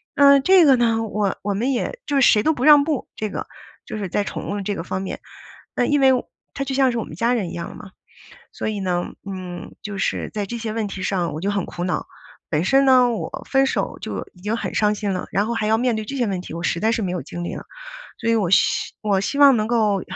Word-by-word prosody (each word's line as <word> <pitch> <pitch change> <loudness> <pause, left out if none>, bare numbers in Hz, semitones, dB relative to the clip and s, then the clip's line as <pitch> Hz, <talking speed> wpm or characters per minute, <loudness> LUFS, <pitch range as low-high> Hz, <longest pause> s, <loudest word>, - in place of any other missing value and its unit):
那 280 -1 +7
这 370 +4 +6
个 275 -3 +7
呢 225 -1 +2
我 210 -3 -1
我 205 0 -1
们 240 +7 0
也 370 - -2
就 290 - -1
是 - - +2
谁 210 - +5
都 315 - +3
不 250 - -3
让 295 -1 +8
步， 295 -3 -2
这 215 - -3
个 - - -5 0.4
就 - - -6
是 195 -3 -4
在 205 - 0
宠 - - -6
物 205 0 -2
这 200 +1 -2
个 165 - -4
方 185 - -3
面， - - -5 0.6
那 245 - +1
因 290 0 +2
为 265 -1 +6 0.4
它 275 - -3
就 275 - -4
像 265 -2 +3
是 235 - -2
我 - - -2
们 155 - -10
家 235 +5 +2
人 195 -8 -2
一 - - -7
样 170 - -6
嘛。 195 - -11 0.6
所 - - -3
以 210 - -3
呢， 180 -2 -1 0.3
嗯， 185 -2 -7
就 205 -1 -6
是 - - -1
在 205 -2 -2
这 235 - -5
些 225 -1 -4
问 220 -2 -2
题 195 -1 -6
上 185 -3 -1
我 155 - -5
就 200 - 0
很 200 -3 -1
苦 175 - -6
恼。 180 - -1 0.4
本 155 +2 0
身 270 +7 +4
呢， 255 -2 +5
我 225 - -5
分 270 0 +4
手 270 - -2
就 - - -5
已 180 - -19
经 215 +3 -1
很 - - -4
伤 210 -1 +3
心 205 -2 -2
了， 185 - -3
然 200 +2 +1
后 235 - -1
还 215 -2 -1
要 220 +1 +3
面 245 -1 +1
对 220 - -3
这 275 - -5
些 240 -4 +1
问 185 -2 -2
题， - - -9
我 170 - -5
实 170 - -1
在 220 +1 +3
是 230 - -1
没 185 -4 -2
有 180 - -3
精 175 +5 -6
力 - - -4
了。 - - -7 0.6
所 230 - -1
以 230 - +4
我， 200 -6 +1
希 - - +2
我 200 -3 +1
希 240 +8 -2
望 280 -3 +7
能 215 0 0
够 215 -4 +2
215 Hz, 290 characters per minute, -22 LUFS, 195-250 Hz, 0.6 s, 让